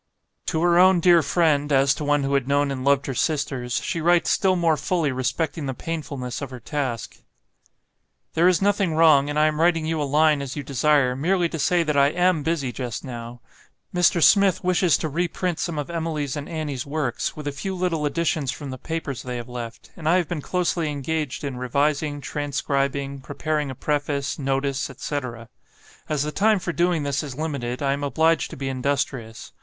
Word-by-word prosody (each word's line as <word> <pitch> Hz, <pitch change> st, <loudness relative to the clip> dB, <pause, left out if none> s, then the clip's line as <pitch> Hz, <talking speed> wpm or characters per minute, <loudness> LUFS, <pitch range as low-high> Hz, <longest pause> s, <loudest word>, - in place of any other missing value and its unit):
To 160 Hz, +1 st, 0 dB
her 175 Hz, 0 st, +4 dB
own 185 Hz, 0 st, +6 dB
dear 170 Hz, -1 st, +6 dB
friend, 150 Hz, -1 st, +1 dB
as 135 Hz, 0 st, +4 dB
to 150 Hz, -, -5 dB
one 145 Hz, -1 st, +2 dB
who 135 Hz, +1 st, -1 dB
had 135 Hz, -2 st, +1 dB
known 140 Hz, 0 st, +2 dB
and 130 Hz, -1 st, -4 dB
loved 140 Hz, 0 st, +3 dB
her 135 Hz, -, -3 dB
sisters, 130 Hz, -4 st, -1 dB
she 165 Hz, -, -2 dB
writes 175 Hz, +1 st, +3 dB
still 190 Hz, -1 st, +3 dB
more 170 Hz, -3 st, +2 dB
fully 155 Hz, 0 st, 0 dB
respecting 130 Hz, +4 st, -2 dB
the 130 Hz, -, -3 dB
painfulness 140 Hz, -5 st, -5 dB
of 140 Hz, -, -4 dB
her 130 Hz, -1 st, -8 dB
task. 130 Hz, -3 st, -4 dB, 1.2 s
"There 170 Hz, +2 st, +4 dB
is 185 Hz, 0 st, +3 dB
nothing 200 Hz, -5 st, +2 dB
wrong, 155 Hz, -3 st, +5 dB
and 145 Hz, -, -2 dB
I 155 Hz, -, +4 dB
am 155 Hz, 0 st, 0 dB
writing 165 Hz, -2 st, +3 dB
you 160 Hz, -1 st, -1 dB
a -, -, +1 dB
line 150 Hz, -1 st, +4 dB
as 135 Hz, -2 st, -5 dB
you 145 Hz, -, -4 dB
desire, 140 Hz, -1 st, +2 dB
merely 175 Hz, +5 st, +1 dB
to 165 Hz, -, -5 dB
say 175 Hz, +4 st, +2 dB
that 150 Hz, -2 st, -1 dB
I 140 Hz, 0 st, +5 dB
AM 175 Hz, 0 st, +2 dB
busy 145 Hz, -5 st, -1 dB
just 120 Hz, -3 st, -5 dB
now. 120 Hz, -1 st, -8 dB, 0.5 s
Mr. 175 Hz, -2 st, +3 dB
Smith 200 Hz, -3 st, +5 dB
wishes 180 Hz, -2 st, +3 dB
to 160 Hz, -, -3 dB
reprint 175 Hz, +2 st, -2 dB
some 170 Hz, -3 st, -2 dB
of 145 Hz, +3 st, -4 dB
Emily's 160 Hz, -5 st, -2 dB
and 145 Hz, -1 st, -6 dB
Annie's 150 Hz, -6 st, -3 dB
works, 145 Hz, -4 st, -2 dB
with 150 Hz, -1 st, -6 dB
a -, -, 0 dB
few 190 Hz, +7 st, -4 dB
little 175 Hz, -4 st, -1 dB
additions 155 Hz, -3 st, 0 dB
from 140 Hz, +1 st, -7 dB
the 130 Hz, -, -7 dB
papers 160 Hz, -5 st, -4 dB
they 125 Hz, -1 st, -5 dB
have 120 Hz, -, -6 dB
left; 115 Hz, -2 st, -8 dB
and 155 Hz, -1 st, -2 dB
I 170 Hz, -, +5 dB
have 175 Hz, -3 st, 0 dB
been 160 Hz, -2 st, -3 dB
closely 175 Hz, -1 st, -1 dB
engaged 150 Hz, 0 st, -3 dB
in 140 Hz, -3 st, -4 dB
revising, 145 Hz, +3 st, 0 dB
transcribing, 140 Hz, -1 st, -2 dB
preparing 150 Hz, +2 st, -2 dB
a 130 Hz, -, -6 dB
preface, 145 Hz, 0 st, -2 dB
notice, 135 Hz, 0 st, -1 dB
etc. 130 Hz, -4 st, -5 dB, 0.6 s
As 150 Hz, -2 st, 0 dB
the 150 Hz, -, -3 dB
time 215 Hz, +5 st, +3 dB
for 175 Hz, -2 st, -3 dB
doing 175 Hz, -2 st, +1 dB
this 140 Hz, -1 st, -1 dB
is 140 Hz, -4 st, -7 dB
limited, 140 Hz, -5 st, -3 dB
I 140 Hz, 0 st, +2 dB
am 140 Hz, +1 st, -4 dB
obliged 160 Hz, +3 st, +2 dB
to -, -, -9 dB
be 135 Hz, 0 st, -4 dB
industrious. 130 Hz, -3 st, -3 dB
145 Hz, 200 wpm, -23 LUFS, 135-165 Hz, 1.2 s, own